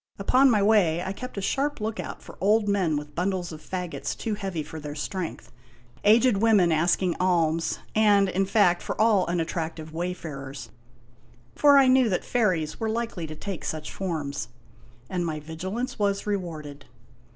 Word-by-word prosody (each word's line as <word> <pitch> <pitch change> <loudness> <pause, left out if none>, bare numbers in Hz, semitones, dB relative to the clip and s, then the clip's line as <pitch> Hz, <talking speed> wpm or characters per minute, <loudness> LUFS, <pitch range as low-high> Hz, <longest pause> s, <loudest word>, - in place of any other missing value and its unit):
Upon 255 +7 +4
my 210 -4 +3
way 180 -6 +3
I 190 +1 -3
kept 255 +2 -8
a - - -1
sharp 285 +7 -1
lookout 220 +1 -5
for - - -12
old 210 +2 +3
men 185 -7 +1
with 150 0 -7
bundles 180 -1 -2
of 155 -1 -9
fagots 180 0 -4
too 225 - -3
heavy 195 -6 -3
for 160 - -8
their 150 -1 -7
strength, 175 +3 -5 0.5
aged 220 +1 +5
women 205 -5 +4
asking 170 +2 +2
alms, 165 -3 +1 0.2
and, 205 -2 +4
in 190 +1 0
fact, 190 -4 +3
for - - -5
all 215 -4 +4
unattractive 165 -2 -3
wayfarers; 140 - -5 0.8
for 285 -1 +6
I 270 -1 +6
knew 255 -2 +5
that 180 - -1
fairies 185 -10 0
were 225 - -1
likely 225 -7 -3
to 155 - -7
take 190 +1 -6
such 155 -1 -4
forms. 155 -7 -3 0.6
And 180 +3 -2
my 160 -2 -3
vigilance 185 - -5
was 200 -1 0
rewarded. 160 -8 -4
185 Hz, 160 wpm, -26 LUFS, 160-210 Hz, 0.8 s, for